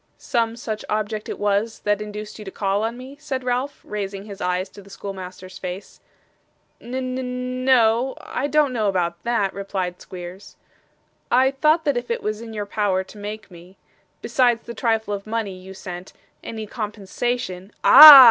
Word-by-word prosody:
'Some 230 -1 0
such 220 -2 -5
object 215 0 -2
it - - -4
was, 205 +2 0
that 205 0 +1
induced 210 +1 -7
you - - -7
to - - -5
call 195 +1 -1
on 230 +2 -2
me?' 260 +2 -10
said 275 -4 -4
Ralph, 250 +3 -2
raising 200 -1 -5
his 200 -2 -9
eyes 180 +1 0
to 205 - -13
the 200 - -16
schoolmaster's 185 -1 -8
face. 185 +1 -7 0.8
'N 245 +2 -7
n 255 0 -3
no, 250 0 +4
I 275 - -3
don't 295 -2 +2
know 215 -4 +1 0.3
that,' 230 -5 0
replied 190 -2 -4
Squeers. 180 +2 -9 0.7
'I 260 +2 +4
thought 310 +4 +2
that 285 -4 +2
if 245 0 -4
it 235 - -2
was 215 +1 -2
in 230 -1 -8
your 210 -2 -4
power 200 -2 0
to 190 +3 -15
make 210 -1 -7
me, 180 +2 -14 0.5
besides 240 -3 +2
the 235 - -6
trifle 225 -2 0
of 200 +1 -5
money 220 -3 -2
you 190 +1 -11
sent, 180 -1 -8 0.3
any 220 -1 -5
compensation 210 -2 -4
' - - -43
'Ah! 300 -2 +13
215 Hz, 175 wpm, -23 LUFS, 195-245 Hz, 0.8 s, Ah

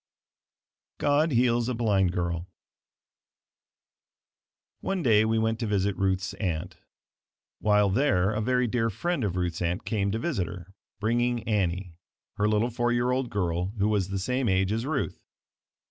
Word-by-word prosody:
GOD 150 +2 +2
HEALS 120 -2 +2
A 125 - -1
BLIND 100 -6 +2
GIRL 85 -1 -2 2.3
One 190 -3 -2
day 110 -4 +5
we 110 0 +1
went 110 0 0
to 115 - -2
visit 100 -1 +1
Ruth's 95 0 0
aunt. 90 -3 -3 0.8
While 105 -2 +3
there, 100 -5 +2
a 110 0 -1
very 125 +2 +2
dear 115 -1 0
friend 170 - -2
of 95 -4 -1
Ruth's 90 -2 -2
aunt 85 +1 -1
came 100 -3 0
to 110 - -1
visit 115 - -1
her, 90 +1 -9 0.3
bringing 120 +2 +1
Annie, 95 -4 -1 0.4
her 105 - +2
little 110 +3 +1
four 120 +1 0
year 120 +1 +1
old 130 -1 0
girl 90 0 -1
who 100 +1 +2
was 100 -3 0
the 100 - -2
same 125 +5 0
age 95 +1 +2
as 115 +4 -1
Ruth. 145 -3 -2
105 Hz, 155 wpm, -27 LUFS, 95-120 Hz, 2.3 s, day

